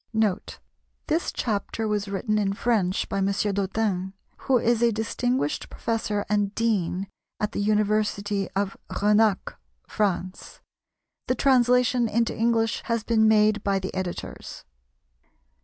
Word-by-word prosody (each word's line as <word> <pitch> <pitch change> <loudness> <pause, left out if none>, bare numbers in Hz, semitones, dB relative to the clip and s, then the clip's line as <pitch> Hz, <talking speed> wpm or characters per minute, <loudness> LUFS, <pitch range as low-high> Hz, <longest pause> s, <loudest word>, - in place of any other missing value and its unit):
[Note. 215 -4 0 0.5
This 325 +2 0
chapter 220 0 -2
was 210 -1 -1
written 215 +2 -1
in 195 -1 0
French 200 -4 0
by 195 - -2
M. 195 - +1
Dottin, 195 -1 -1 0.3
who 260 - +5
is 235 0 +1
a 235 -1 +4
distinguished 225 - -1
professor 215 -3 -2
and 205 -1 0
dean 195 -5 0 0.3
at 210 - -1
the - - -4
University 210 -1 0
of 195 0 -1
Renacs, 210 0 +2 0.3
France. 190 -2 -2 0.7
The 255 - +1
translation 250 -2 +3
into 230 +1 0
English 225 -1 +1
has 230 -2 -1
been 220 -1 +3
made 215 -1 +4
by 200 -1 +1
the 190 0 -4
Editors. 185 -2 -6
210 Hz, 125 wpm, -25 LUFS, 200-230 Hz, 0.7 s, who